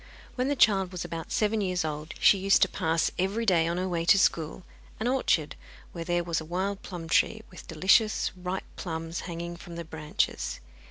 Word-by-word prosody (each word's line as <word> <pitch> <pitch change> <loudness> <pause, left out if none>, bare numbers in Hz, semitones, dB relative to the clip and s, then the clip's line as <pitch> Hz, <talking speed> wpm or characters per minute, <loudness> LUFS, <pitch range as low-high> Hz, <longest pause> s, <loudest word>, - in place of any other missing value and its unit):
When 255 +1 -1
the 285 - +1
child 195 -7 +4
was 180 -2 -5
about 165 -1 -6
seven 215 0 +1
years 180 -4 0
old 155 +1 -5
she 200 - +6
used 195 +2 +4
to - - +3
pass 165 -2 0
every 200 +5 0
day, 170 -5 +3
on 170 +1 -1
her 185 +1 -1
way 170 -2 -1
to 200 - +6
school, 165 -2 +1 0.4
an 220 - -1
orchard 245 - +1 0.4
where 170 - -5
there 175 0 0
was 170 -1 -1
a - - -6
wild 190 +5 -2
plum 175 -3 -7
tree, 220 +6 +2
with 180 - -12
delicious 195 +7 +3
ripe 180 +1 -4
plums 165 -1 -4
hanging 170 0 -5
from 170 0 -10
the 170 0 -6
branches. 155 -1 -2
180 Hz, 200 wpm, -28 LUFS, 165-195 Hz, 0.4 s, she